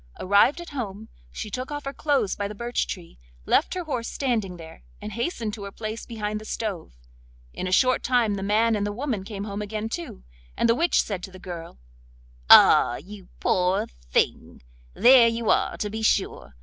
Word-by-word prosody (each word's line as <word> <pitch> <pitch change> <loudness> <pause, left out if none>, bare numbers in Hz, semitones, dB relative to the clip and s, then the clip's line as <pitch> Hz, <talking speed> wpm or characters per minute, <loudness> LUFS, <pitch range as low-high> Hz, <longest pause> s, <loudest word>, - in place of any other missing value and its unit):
Arrived 205 - +4
at 345 -2 -9
home, 220 -6 -6 0.2
she 210 - -6
took 255 +3 -4
off 290 -1 -5
her 275 - -4
clothes 280 -11 0
by 205 - -3
the 210 - -8
birch 235 +3 -2
tree, 170 - -8 0.3
left - - +2
her 365 - -3
horse 250 -8 -3
standing 220 -9 -2
there, 160 - -12 0.2
and 215 - -7
hastened 235 - -3
to 210 - -7
her 200 - -7
place 215 +2 -6
behind 215 -2 -4
the - - -9
stove. 210 - -5 0.6
In 185 - -4
a - - -3
short 255 +6 +3
time 240 -4 +2
the 200 - -4
man 215 +3 +2
and 205 - -1
the 205 - -2
woman 230 -3 -3
came 200 -1 -6
home 205 0 -5
again 215 +1 -4
too, 170 - -6 0.3
and - - +2
the 230 - +5
witch 335 +9 +2
said 195 -4 -4
to 190 - -8
the 185 - -11
girl: 175 - -8 0.7
'Ah! 120 - +8
you 190 +5 -11
poor 180 +1 +1 0.2
thing, - - -1 0.3
there 245 -1 +7
you 230 -1 0
are - - +1
to 210 - -2
be 220 +1 -4
sure! 65 - 0
215 Hz, 200 wpm, -25 LUFS, 195-235 Hz, 0.7 s, Ah